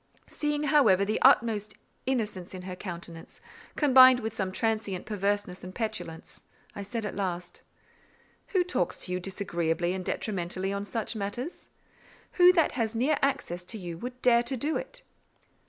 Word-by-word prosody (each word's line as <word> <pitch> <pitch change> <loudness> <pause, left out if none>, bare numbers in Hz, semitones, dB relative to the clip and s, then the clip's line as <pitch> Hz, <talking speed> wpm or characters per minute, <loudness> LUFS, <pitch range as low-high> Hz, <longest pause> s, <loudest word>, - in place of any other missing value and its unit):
Seeing, 295 0 -2
however, 270 -10 +4
the 215 +2 -1
utmost 225 -5 +4 0.3
innocence 210 -8 -2
in 180 - -8
her 185 0 -6
countenance—combined 245 - +2
with 220 -2 -4
some 190 -1 -2
transient 215 -3 -2
perverseness 205 -2 -2
and 185 +1 -9
petulance—I 215 -4 -7
said 225 +2 -4
at 210 - -4
last,— 180 -3 -4 0.9
"Who 370 -3 +2
talks 350 - -2
to - - -6
you 180 - -1
disagreeably 175 -2 -1
and 190 -1 -4
detrimentally 190 -1 -2
on 200 0 -3
such 225 +2 -3
matters? 220 - -5 0.6
Who 360 0 +7
that 330 -4 +3
has 230 -3 -2
near 275 +6 +2
access 265 -11 -1
to 220 - -4
you 175 -4 -6
would 250 +3 -7
dare 235 -1 +5
to 245 +2 -2
do 300 +6 -1
it?" - - -5
210 Hz, 150 wpm, -28 LUFS, 185-250 Hz, 0.9 s, Who